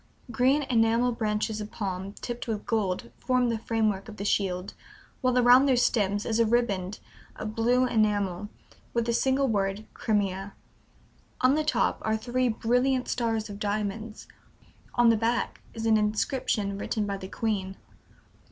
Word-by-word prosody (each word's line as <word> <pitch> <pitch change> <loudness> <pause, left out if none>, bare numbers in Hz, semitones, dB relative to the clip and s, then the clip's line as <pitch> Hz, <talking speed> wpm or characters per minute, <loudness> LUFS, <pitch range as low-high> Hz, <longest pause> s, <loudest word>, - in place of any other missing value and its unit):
Green 260 +6 +3
enamel 235 -1 +2
branches 215 -1 -1
of 210 - -6
palm, 195 -2 -4
tipped 240 +2 -6
with 215 -2 -3
gold, 190 - -1
form 250 -1 +1
the 230 -1 -1
framework 215 -3 -1
of 215 - -10
the 200 - -4
shield, 190 -2 0 0.5
while 255 -1 +2
around 250 +2 +6
their 265 - +4
stems 205 -4 +1
is 225 0 0
a 230 - +5
riband 210 -5 0 0.4
of 215 0 -5
blue 245 +3 +3
enamel, 205 -4 0 0.5
with 235 -1 +1
the 235 - 0
single 265 +3 +2
word 200 -1 -1
'Crimea.' 195 -2 -1 0.9
On 255 +1 +5
the 310 +1 +1
top 305 - +1
are 220 0 0
three 250 +3 0
brilliant 250 +3 +1
stars 225 -3 -1
of 200 -1 -8
diamonds. 210 +1 -3 0.7
On 240 -1 +5
the 230 - +5
back 230 +2 -1
is 225 0 -4
an 220 -1 +5
inscription 210 -1 -1
written 215 0 -1
by 200 -1 -3
the 190 - -8
Queen." 195 -4 -2
220 Hz, 155 wpm, -27 LUFS, 205-240 Hz, 0.9 s, around